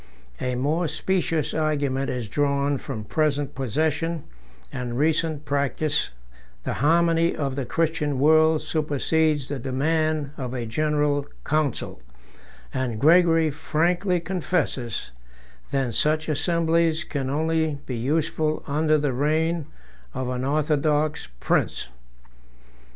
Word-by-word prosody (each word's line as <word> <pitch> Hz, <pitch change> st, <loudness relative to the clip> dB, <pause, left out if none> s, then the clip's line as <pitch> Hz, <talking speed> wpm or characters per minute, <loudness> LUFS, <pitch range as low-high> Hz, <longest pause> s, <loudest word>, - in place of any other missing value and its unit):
A 125 Hz, 0 st, -1 dB
more 155 Hz, +7 st, 0 dB
specious 165 Hz, -2 st, 0 dB
argument 145 Hz, -4 st, 0 dB
is 125 Hz, -3 st, -3 dB
drawn 140 Hz, +3 st, +1 dB
from 120 Hz, -6 st, -5 dB
present 145 Hz, +3 st, 0 dB
possession 155 Hz, +5 st, -1 dB, 0.5 s
and 125 Hz, -2 st, -3 dB
recent 155 Hz, 0 st, +1 dB
practice 140 Hz, +1 st, 0 dB, 0.5 s
the -, -, -2 dB
harmony 165 Hz, +3 st, +3 dB
of 135 Hz, -3 st, -2 dB
the 135 Hz, -3 st, -3 dB
Christian 155 Hz, -2 st, 0 dB
world 155 Hz, +2 st, +4 dB
supersedes 155 Hz, -1 st, +1 dB
the 140 Hz, -2 st, -4 dB
demand 150 Hz, +3 st, 0 dB
of 130 Hz, -2 st, -4 dB
a 120 Hz, -2 st, -3 dB
general 145 Hz, +3 st, 0 dB, 0.2 s
council; 155 Hz, -, -1 dB, 0.7 s
and 125 Hz, -4 st, -2 dB
Gregory 165 Hz, +1 st, +5 dB
frankly 175 Hz, +4 st, +1 dB
confesses, 165 Hz, -, -2 dB, 0.6 s
than 135 Hz, -4 st, -1 dB
such 155 Hz, +6 st, +1 dB
assemblies 165 Hz, 0 st, +1 dB
can 135 Hz, -4 st, -3 dB
only 160 Hz, +1 st, 0 dB
be 125 Hz, -, -4 dB
useful 155 Hz, +5 st, 0 dB
under 155 Hz, +1 st, +2 dB
the 145 Hz, -3 st, 0 dB
reign 155 Hz, +4 st, 0 dB, 0.5 s
of 130 Hz, -1 st, -2 dB
an 125 Hz, 0 st, -2 dB
orthodox 150 Hz, -, +1 dB
prince. -, -, 0 dB
150 Hz, 110 wpm, -24 LUFS, 135-160 Hz, 0.7 s, Gregory